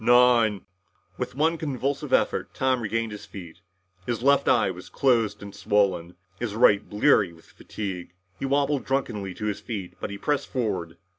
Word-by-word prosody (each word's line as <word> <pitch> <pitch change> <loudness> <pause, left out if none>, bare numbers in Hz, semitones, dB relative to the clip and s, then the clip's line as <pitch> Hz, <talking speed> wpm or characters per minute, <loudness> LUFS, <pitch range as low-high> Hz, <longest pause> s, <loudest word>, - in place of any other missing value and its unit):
"Nine 120 -4 +4 0.3
" - - -39
With - - -4
one 160 +3 +1
convulsive 140 -2 -2
effort, - - +1
Tom 130 -1 +1
regained 115 0 -1
his 105 - -9
feet. 85 -5 -10 0.5
His 120 -1 -2
left 140 +1 +4
eye - - +4
was - - -10
closed 115 -6 +1
and 100 -1 -9
swollen, 100 -4 +1 0.2
his 115 -4 -3
right 110 -4 +5
bleary 105 -3 +3
with 80 -1 -18
fatigue. 90 -4 -7 0.2
He - - -2
wobbled 140 0 +1
drunkenly 110 -9 -2
on 105 - -3
his 105 -1 -2
feet. 105 -4 -6
But - - -4
he 100 - -6
pressed 145 +6 -1
forward. 100 -10 -2
110 Hz, 170 wpm, -26 LUFS, 100-130 Hz, 0.5 s, right